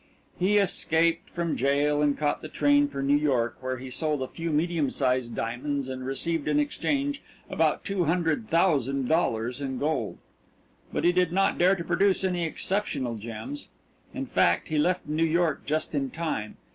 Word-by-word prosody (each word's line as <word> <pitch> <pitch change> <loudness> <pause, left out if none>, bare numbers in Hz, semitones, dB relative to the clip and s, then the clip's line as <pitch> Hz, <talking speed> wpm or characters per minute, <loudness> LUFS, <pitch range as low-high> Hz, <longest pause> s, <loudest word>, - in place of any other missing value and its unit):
He 195 +3 +3
escaped 165 -4 +2
from 170 -2 -2
jail 145 +2 +2
and 145 -1 +2
caught 150 -1 0
the - - -6
train 145 -1 +3
for 140 -1 -5
New 140 +1 +3
York, 130 -6 +1
where 130 0 -3
he 130 +1 -8
sold 150 0 -1
a - - -4
few 165 +4 -5
medium 160 -1 +1
sized 125 -3 0
diamonds 135 +4 -2
and 130 -1 -5
received 145 +4 -1
in 150 -1 +2
exchange 280 - -1 0.3
about - - +1
two 195 -4 0
hundred 170 +6 0
thousand 140 -7 +2
dollars 125 -5 0
in 135 -2 -3
gold. 155 +4 -1 0.7
But - - -2
he 175 - +5
did 180 -1 +2
not 195 +2 +1
dare 185 +3 +5
to 170 - -5
produce 195 +2 +2
any 180 -2 0
exceptional 155 - -1
gems 115 +5 -6 0.4
in - - -4
fact, 85 -1 +2
he 155 -1 +1
left 180 +4 +1
New 155 +2 -1
York 165 0 +1
just 155 +2 -1
in 140 -2 -1
time. 155 -11 -4
150 Hz, 175 wpm, -27 LUFS, 135-170 Hz, 0.7 s, he